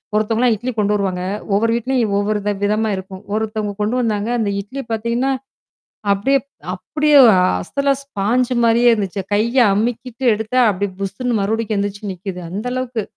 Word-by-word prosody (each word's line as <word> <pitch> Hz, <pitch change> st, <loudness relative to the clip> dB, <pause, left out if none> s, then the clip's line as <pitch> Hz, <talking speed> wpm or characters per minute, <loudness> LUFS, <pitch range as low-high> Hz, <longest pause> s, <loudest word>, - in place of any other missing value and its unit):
ஒருத்தவங்கலாம் 225 Hz, +3 st, +2 dB
இட்லி 240 Hz, +5 st, -4 dB
கொண்டு 210 Hz, -1 st, +2 dB
வருவாங்க. 190 Hz, -3 st, -1 dB, 0.3 s
ஒவ்வொரு 225 Hz, +3 st, +2 dB
வீட்டுலயும் 235 Hz, -2 st, 0 dB
ஒவ்வொரு 210 Hz, +1 st, 0 dB
வி -, -, +3 dB
விதமா 215 Hz, +2 st, +1 dB
இருக்கும். 190 Hz, 0 st, -8 dB
ஒருத்தவங்க 215 Hz, -1 st, -2 dB
கொண்டு 215 Hz, +4 st, 0 dB
வந்தாங்க. 215 Hz, -2 st, -1 dB
அந்த 215 Hz, -3 st, 0 dB
இட்லி 255 Hz, +8 st, -7 dB
பார்த்தீங்கன்னா, 235 Hz, +4 st, 0 dB, 0.8 s
அப்படியே 240 Hz, +8 st, +2 dB, 0.4 s
அப்படியே 300 Hz, 0 st, 0 dB
ஒரு 230 Hz, +8 st, +2 dB
ஸ்பாஞ்ச் 245 Hz, -1 st, 0 dB
மாதிரியே 235 Hz, +1 st, +5 dB
இருந்துச்சு. 200 Hz, -3 st, -2 dB
கைய 225 Hz, +5 st, +1 dB, 0.2 s
அமிக்கிட்டு 240 Hz, +4 st, -2 dB
எடுத்தா 220 Hz, +4 st, -2 dB
அப்படியே 200 Hz, 0 st, -2 dB
புசுன்னு 220 Hz, +4 st, -2 dB
மறுபடியும் 220 Hz, +2 st, -1 dB
எந்திருச்சு 205 Hz, +1 st, -3 dB
நிக்குது. 185 Hz, 0 st, -6 dB
அந்த 205 Hz, +6 st, -5 dB
அளவுக்கு. 250 Hz, -3 st, -2 dB
220 Hz, 145 wpm, -19 LUFS, 205-240 Hz, 0.8 s, மாதிரியே